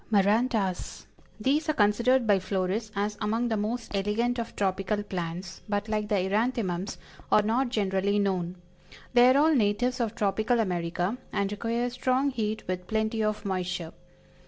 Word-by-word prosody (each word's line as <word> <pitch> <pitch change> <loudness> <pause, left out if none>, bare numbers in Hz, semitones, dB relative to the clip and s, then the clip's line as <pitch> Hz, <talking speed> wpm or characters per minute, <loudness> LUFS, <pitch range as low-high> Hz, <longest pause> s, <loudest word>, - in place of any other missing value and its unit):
MARANTAS. 210 -1 +1 0.3
These 290 +8 +1
are - - +3
considered 235 +3 +3
by 205 -3 +4
florists 190 +3 -2
as 205 +1 -2
among 225 +3 0
the 225 - +1
most 225 +3 -3
elegant 225 +5 0
of 230 - -5
tropical 195 +1 0
plants, 180 -1 -5
but 205 +1 -1
like 215 -1 -1
the 210 - +2
Eranthemums, 200 -1 0 0.3
are 210 - +5
not 240 +4 +1
generally 200 -2 +1
known. 185 -3 0 0.6
They 245 0 +7
are 260 - +5
all 315 +2 +5
natives 245 +2 +1
of 230 -2 -1
tropical 215 +3 +1
America, 180 +2 -1
and 200 0 -1
require 230 +3 -1
strong 255 +2 +1
heat 220 -3 -3
with 180 0 -3
plenty 220 0 0
of 215 -1 -1
moisture. 180 -3 -2
210 Hz, 155 wpm, -28 LUFS, 195-235 Hz, 0.6 s, They